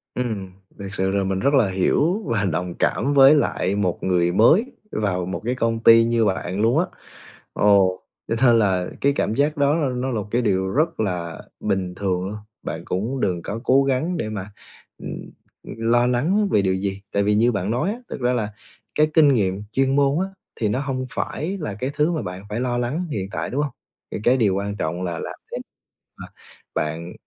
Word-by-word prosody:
Ừm, 110 Hz, -7 st, -3 dB, 0.3 s
thiệt 100 Hz, -1 st, -6 dB
sự 95 Hz, -1 st, 0 dB
là 100 Hz, 0 st, +1 dB
mình 95 Hz, 0 st, -1 dB
rất 140 Hz, +7 st, +2 dB
là 120 Hz, -8 st, +4 dB
hiểu 150 Hz, -, +1 dB
và 105 Hz, -3 st, 0 dB
đồng 90 Hz, 0 st, -2 dB
cảm 140 Hz, -, +1 dB
với 140 Hz, +1 st, +8 dB
lại 100 Hz, -9 st, 0 dB
một 95 Hz, -4 st, -1 dB
người 90 Hz, -2 st, +2 dB
mới 120 Hz, -, +5 dB, 0.3 s
vào 95 Hz, -4 st, -1 dB
một 95 Hz, -, -4 dB
cái 125 Hz, +2 st, 0 dB
công 115 Hz, -2 st, 0 dB
ty 115 Hz, 0 st, +8 dB
như 115 Hz, -1 st, +2 dB
bạn 95 Hz, 0 st, -1 dB
luôn 115 Hz, +7 st, +3 dB
á. 175 Hz, -, +2 dB, 0.7 s
Ồ, 100 Hz, -2 st, +5 dB, 0.4 s
cho -, -, 0 dB
nên 120 Hz, -1 st, +6 dB
là 95 Hz, -4 st, +2 dB
cái 140 Hz, +1 st, +3 dB
cảm -, -, 0 dB
giác 145 Hz, +4 st, +1 dB
đó 145 Hz, 0 st, +3 dB
l 135 Hz, -6 st, -1 dB
nó 130 Hz, -, -1 dB
là 115 Hz, -4 st, -1 dB
một 105 Hz, -, -8 dB
cái 120 Hz, +3 st, +1 dB
điều 95 Hz, -4 st, +1 dB
rất 155 Hz, -, 0 dB
là 90 Hz, -6 st, -2 dB, 0.2 s
bình 95 Hz, -2 st, -1 dB
thường 90 Hz, -1 st, -1 dB
luôn, 105 Hz, -, -5 dB, 0.3 s
bạn 80 Hz, +2 st, -5 dB
cũng 115 Hz, +10 st, -2 dB
đừng 90 Hz, -5 st, 0 dB
có 105 Hz, +6 st, -5 dB
cố 135 Hz, +2 st, +5 dB
gắng 140 Hz, +7 st, 0 dB
để 115 Hz, -, -2 dB
mà, 105 Hz, -1 st, -6 dB, 0.5 s
ừm, -, -, -7 dB, 0.5 s
ừm, -, -, -9 dB, 0.2 s
lo 120 Hz, +1 st, +4 dB
lắng 170 Hz, +13 st, +1 dB
về 100 Hz, -, +3 dB
điều 95 Hz, -1 st, +1 dB
gì. 95 Hz, +1 st, -3 dB
Tại 100 Hz, -, +2 dB
vì 105 Hz, +1 st, +2 dB
như 115 Hz, +3 st, +3 dB
bạn 100 Hz, -1 st, -2 dB
nói 125 Hz, -, 0 dB
á, 235 Hz, -, -7 dB
thực -, -, -6 dB
ra 125 Hz, 0 st, +2 dB
là 110 Hz, -4 st, -2 dB, 0.4 s
cái 155 Hz, -, +4 dB
kinh 150 Hz, -4 st, +6 dB
nghiệm 100 Hz, -3 st, 0 dB
chuyên 135 Hz, +2 st, +2 dB
môn 140 Hz, +1 st, +3 dB
á, 190 Hz, -, 0 dB, 0.3 s
thì 110 Hz, -, 0 dB
nó 105 Hz, +6 st, 0 dB
hông 130 Hz, -2 st, -3 dB
phải 185 Hz, +6 st, -3 dB
là 105 Hz, -10 st, -4 dB
cái 125 Hz, +6 st, -3 dB
thứ 150 Hz, +3 st, +2 dB
mà 160 Hz, -, -2 dB
bạn 90 Hz, +2 st, -7 dB
phải 105 Hz, +3 st, -3 dB
lo 125 Hz, -1 st, -1 dB
lắng 140 Hz, +9 st, -2 dB
hiện 95 Hz, -7 st, -3 dB
tại, -, -, -3 dB
đúng 145 Hz, +3 st, 0 dB
hông? 145 Hz, -, -3 dB, 0.4 s
Thì -, -, -2 dB
cái 125 Hz, +2 st, +5 dB
điều 105 Hz, -7 st, +2 dB
quan 100 Hz, +1 st, -3 dB
trọng 85 Hz, -1 st, -3 dB
là 85 Hz, -2 st, -3 dB
làm -, -, -5 dB, 0.2 s
thế -, -, -2 dB, 0.6 s
mà -, -, -8 dB, 0.5 s
bạn, 80 Hz, +3 st, -3 dB
110 Hz, 220 wpm, -22 LUFS, 95-135 Hz, 0.7 s, với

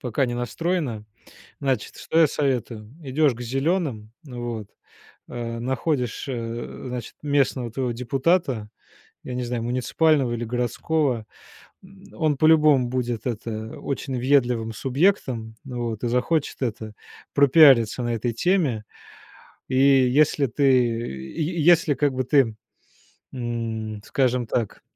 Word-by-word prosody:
пока 130 Hz, +2 st, 0 dB
не 120 Hz, -, -3 dB
настроена. 125 Hz, -1 st, -2 dB, 0.6 s
Значит, 130 Hz, -6 st, -2 dB
что 160 Hz, -, -1 dB
я 160 Hz, -, +7 dB
советую? 125 Hz, -6 st, -2 dB
Идёшь 140 Hz, 0 st, +2 dB
к 120 Hz, -, -12 dB
зелёным, 135 Hz, -, -1 dB
вот, 120 Hz, -6 st, -6 dB, 0.6 s
а 115 Hz, -1 st, -5 dB
находишь, 130 Hz, 0 st, -2 dB
э, 115 Hz, -2 st, -5 dB
значит, 125 Hz, -2 st, -6 dB
местного 135 Hz, -4 st, +1 dB
твоего 125 Hz, -1 st, -2 dB
депутата, 130 Hz, -, 0 dB, 0.6 s
я 125 Hz, -, -6 dB
не 125 Hz, -, -2 dB
знаю, 120 Hz, -1 st, -3 dB
муниципального 130 Hz, +2 st, +1 dB
или 120 Hz, 0 st, -3 dB
городского, 125 Hz, +1 st, -1 dB, 0.6 s
м, 190 Hz, 0 st, -17 dB
он 155 Hz, -3 st, +1 dB
по-любому 155 Hz, -4 st, +5 dB
будет, 120 Hz, -3 st, -2 dB
это, 110 Hz, -1 st, -5 dB
очень 135 Hz, -2 st, -4 dB
въедливым 120 Hz, -4 st, +1 dB
субъектом, 130 Hz, -, 0 dB
вот, 120 Hz, -4 st, -4 dB
и -, -, +1 dB
захочет, 130 Hz, +6 st, 0 dB
это, 110 Hz, -3 st, -3 dB, 0.4 s
пропиариться 135 Hz, -5 st, +6 dB
на 120 Hz, 0 st, -1 dB
этой 115 Hz, +1 st, -2 dB
теме. 145 Hz, -, +1 dB, 0.9 s
И 130 Hz, -, 0 dB
если 135 Hz, +2 st, +4 dB
ты, 135 Hz, +5 st, -2 dB
й 120 Hz, -, 0 dB
если, 170 Hz, -2 st, +5 dB
как 145 Hz, -2 st, +1 dB
бы, 130 Hz, 0 st, -1 dB
ты, 130 Hz, -5 st, +3 dB, 0.8 s
м, 115 Hz, -3 st, -4 dB
скажем 125 Hz, -3 st, 0 dB
так 115 Hz, -2 st, -2 dB
125 Hz, 125 wpm, -24 LUFS, 115-140 Hz, 0.9 s, я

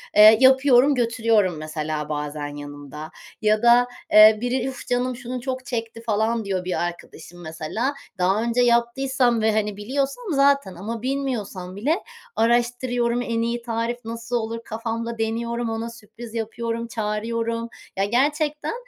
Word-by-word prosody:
eee, 215 Hz, +1 st, +9 dB
yapıyorum, 265 Hz, +1 st, +6 dB
götürüyorum 225 Hz, -7 st, +2 dB
mesela 155 Hz, -1 st, -4 dB
bazen 150 Hz, 0 st, -3 dB
yanımda 145 Hz, +2 st, -9 dB, 0.3 s
ya 215 Hz, 0 st, +3 dB
da, 240 Hz, +1 st, +6 dB, 0.2 s
eee, 215 Hz, 0 st, +8 dB
biri, 245 Hz, +1 st, -1 dB
“Üf, 265 Hz, -, -7 dB
canım 250 Hz, +1 st, 0 dB
şunu 250 Hz, 0 st, -6 dB
çok 255 Hz, 0 st, -4 dB
çekti.” 230 Hz, -2 st, -4 dB
falan 220 Hz, 0 st, 0 dB
diyor, 185 Hz, -2 st, -2 dB
bir 180 Hz, -1 st, -1 dB
arkadaşım 175 Hz, 0 st, -10 dB
mesela. 170 Hz, -, -3 dB, 0.2 s
Daha 190 Hz, +3 st, +2 dB
önce 235 Hz, +1 st, +1 dB
yaptıysam 240 Hz, 0 st, +2 dB
ve, 220 Hz, 0 st, +3 dB
hani, 210 Hz, -1 st, -1 dB
biliyorsam 270 Hz, -, -2 dB
zaten 275 Hz, -8 st, +3 dB
ama 215 Hz, +6 st, -5 dB
bilmiyorsam 235 Hz, -9 st, -3 dB
bile 295 Hz, -, 0 dB, 0.3 s
araştırıyorum, 240 Hz, +1 st, +1 dB
en 230 Hz, -1 st, -1 dB
iyi 235 Hz, +1 st, -1 dB
tarif 230 Hz, +1 st, -2 dB
nasıl 230 Hz, +2 st, -4 dB
olur, 230 Hz, 0 st, -2 dB
kafamda 230 Hz, +1 st, -4 dB
deniyorum, 235 Hz, +1 st, -2 dB
ona 225 Hz, +1 st, -3 dB
sürpriz 230 Hz, 0 st, -12 dB
yapıyorum, 230 Hz, +1 st, -3 dB
çağırıyorum. 230 Hz, +1 st, -2 dB, 0.3 s
Ya, 195 Hz, -, +2 dB
gerçekten, 295 Hz, -, 0 dB
230 Hz, 140 wpm, -23 LUFS, 210-245 Hz, 0.3 s, eee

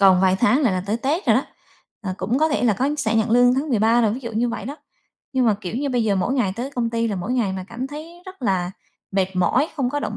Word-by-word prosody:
còn 190 Hz, -2 st, +6 dB
vài 190 Hz, 0 st, +4 dB
tháng 255 Hz, +4 st, +4 dB
là 245 Hz, -, +3 dB
là 185 Hz, -1 st, -1 dB
tới 215 Hz, +3 st, 0 dB
tết 300 Hz, -, -1 dB
rồi -, -, +5 dB
đó, -, -, +2 dB, 0.6 s
ờ, 185 Hz, -2 st, -3 dB
cũng 215 Hz, +8 st, 0 dB
có 315 Hz, +1 st, +3 dB
thể 290 Hz, -, 0 dB
là 220 Hz, -, +4 dB
có 260 Hz, +7 st, 0 dB
sẽ 225 Hz, -3 st, 0 dB
nhận 220 Hz, +1 st, +1 dB
lương 245 Hz, +1 st, +5 dB
tháng 285 Hz, +3 st, -1 dB
13 225 Hz, 0 st, +3 dB
rồi, 215 Hz, -2 st, +2 dB
ví 260 Hz, -, -6 dB
dụ 235 Hz, -3 st, -6 dB
như 235 Hz, +3 st, +1 dB
vậy 230 Hz, -, -4 dB
đó. 285 Hz, -, -6 dB, 0.6 s
Nhưng 255 Hz, -2 st, +2 dB
mà, 215 Hz, -, +4 dB
kiểu 185 Hz, +5 st, -4 dB
như, 280 Hz, +2 st, -1 dB
bây 245 Hz, -3 st, +1 dB
giờ 200 Hz, -2 st, +2 dB
mỗi 245 Hz, +8 st, 0 dB
ngày 210 Hz, -8 st, +1 dB
tới 255 Hz, +3 st, -4 dB
công 240 Hz, -4 st, -1 dB
ty 230 Hz, 0 st, 0 dB
là 200 Hz, -, -2 dB
mỗi 195 Hz, +7 st, -3 dB
ngày 230 Hz, -7 st, +1 dB
mà 190 Hz, -1 st, -5 dB
cảm 245 Hz, +3 st, -4 dB
thấy 325 Hz, +5 st, -10 dB
rất 375 Hz, -7 st, -11 dB
là 180 Hz, -4 st, 0 dB, 0.4 s
mệt 190 Hz, -1 st, 0 dB
mỏi, 250 Hz, -, +2 dB
không 255 Hz, -4 st, 0 dB
có 290 Hz, -, -2 dB
động -, -, -3 dB
235 Hz, 295 wpm, -22 LUFS, 200-265 Hz, 0.6 s, còn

